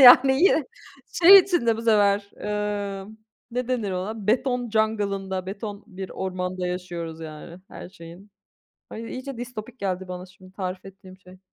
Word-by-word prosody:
Yani 265 Hz, +4 st, +9 dB
yine 420 Hz, +6 st, +5 dB, 0.6 s
şey 390 Hz, +3 st, +12 dB
içinde 340 Hz, -, +2 dB
bu 225 Hz, -, -5 dB
sefer, 205 Hz, -2 st, +3 dB
eee, 205 Hz, -2 st, -3 dB, 0.5 s
ne 250 Hz, +1 st, -3 dB
denir 230 Hz, -6 st, -1 dB
ona? 200 Hz, +3 st, -4 dB
Beton 245 Hz, 0 st, +1 dB
jungle'ında, 200 Hz, -4 st, 0 dB
beton 205 Hz, +1 st, -6 dB
bir 190 Hz, -3 st, -8 dB
ormanda 180 Hz, -1 st, -3 dB
yaşıyoruz 175 Hz, -3 st, -5 dB
yani 160 Hz, +2 st, -9 dB
her -, -, -9 dB
şeyin. 185 Hz, +2 st, -13 dB, 0.6 s
Ay, 230 Hz, +1 st, -7 dB
iyice 260 Hz, -1 st, -6 dB
distopik 245 Hz, 0 st, -7 dB
geldi 190 Hz, -1 st, -2 dB
bana 180 Hz, 0 st, -6 dB
şimdi 185 Hz, 0 st, -18 dB
tarif 185 Hz, -1 st, -5 dB
ettiğim 190 Hz, -1 st, -13 dB
şey. 185 Hz, 0 st, -17 dB
200 Hz, 145 wpm, -25 LUFS, 185-230 Hz, 0.6 s, şey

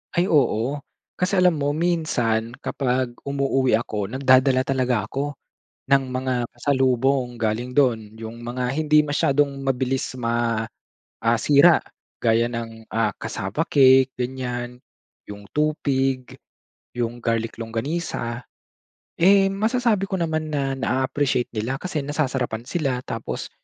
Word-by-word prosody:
Ay 175 Hz, +2 st, +2 dB
oo. 135 Hz, -2 st, +2 dB, 0.4 s
Kasi 180 Hz, +2 st, 0 dB
alam 180 Hz, -3 st, +4 dB
mo, 145 Hz, 0 st, 0 dB
minsan 125 Hz, -10 st, 0 dB
kapag 130 Hz, -2 st, -1 dB, 0.2 s
umuuwi 135 Hz, -2 st, +1 dB
ako 105 Hz, -3 st, -2 dB
nagdadala 130 Hz, +2 st, +4 dB
talaga 130 Hz, -4 st, 0 dB
ako, 145 Hz, +2 st, -3 dB, 0.6 s
ng 140 Hz, -1 st, +5 dB
mga 130 Hz, 0 st, -1 dB, 0.2 s
pasalubong 130 Hz, 0 st, +1 dB
galing 115 Hz, +3 st, -1 dB
do'n. 115 Hz, -6 st, +1 dB
Yung 115 Hz, +1 st, -8 dB
mga 125 Hz, +1 st, -2 dB
hindi 150 Hz, -1 st, +4 dB
masyadong 145 Hz, -1 st, +1 dB
mabilis 130 Hz, 0 st, -1 dB
ma 115 Hz, -2 st, 0 dB, 0.6 s
ah, 115 Hz, 0 st, +3 dB
sira 150 Hz, +4 st, +6 dB, 0.4 s
gaya 115 Hz, 0 st, +3 dB
ng 115 Hz, -1 st, -6 dB, 0.4 s
cassava 95 Hz, +11 st, -3 dB
cake, 130 Hz, -2 st, +5 dB
ganiyan, 125 Hz, -1 st, -4 dB, 0.5 s
yung 100 Hz, 0 st, -9 dB
tupig, 135 Hz, -4 st, 0 dB, 0.6 s
yung 120 Hz, 0 st, -2 dB
garlic 115 Hz, 0 st, -1 dB
longganisa. 120 Hz, +1 st, -3 dB, 0.8 s
Eh, 195 Hz, +2 st, +6 dB
masasabi 220 Hz, 0 st, +1 dB
ko -, -, -6 dB
naman 155 Hz, -2 st, -1 dB
na 135 Hz, -2 st, 0 dB
na-aappreciate 130 Hz, 0 st, 0 dB
nila 115 Hz, +5 st, -2 dB
kasi 180 Hz, -5 st, -2 dB
nasasarapan 130 Hz, -6 st, -2 dB
sila 135 Hz, -5 st, -1 dB
tapos 115 Hz, -, -5 dB
130 Hz, 115 wpm, -23 LUFS, 120-145 Hz, 0.8 s, sira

